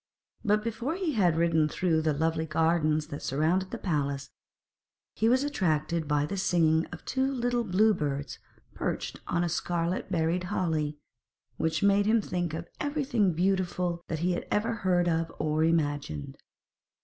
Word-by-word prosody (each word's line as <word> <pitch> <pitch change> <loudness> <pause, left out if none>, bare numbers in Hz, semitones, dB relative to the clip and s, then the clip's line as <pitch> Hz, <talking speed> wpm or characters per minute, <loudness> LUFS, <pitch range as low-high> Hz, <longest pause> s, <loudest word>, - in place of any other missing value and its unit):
But 210 0 +2
before 235 +7 -2
he 360 -5 -1
had 180 -8 +3
ridden 160 -2 +3
through 165 -1 +1
the 155 0 +1
lovely 160 +2 0
gardens 155 -1 +2
that 145 - -6
surrounded 165 +7 +1
the - - -5
palace, 140 -5 -2 0.8
he 225 - +2
was 255 +3 +3
attracted 165 - 0
by 145 0 +2
the 195 +6 -4
singing 165 -3 +2
of - - -10
two 265 +1 0
little 245 -2 0
blue 215 +2 +3
birds 145 -5 -3 0.3
perched - - -3
on 175 0 +1
a - - +1
scarlet 175 +2 -2
berried 170 +1 0
holly, 160 -6 -1 0.6
which 160 +1 0
made 200 0 +4
him 225 +1 +4
think 175 -5 -2
of 165 +1 -6
everything 270 - +1
beautiful 180 -1 0
that 160 - -2
he 180 - +2
had 175 - -3
ever 225 +3 +1
heard 180 -5 +1
of 165 -1 0
or 155 +1 +1
imagined. 145 - -1
170 Hz, 160 wpm, -28 LUFS, 155-200 Hz, 0.8 s, made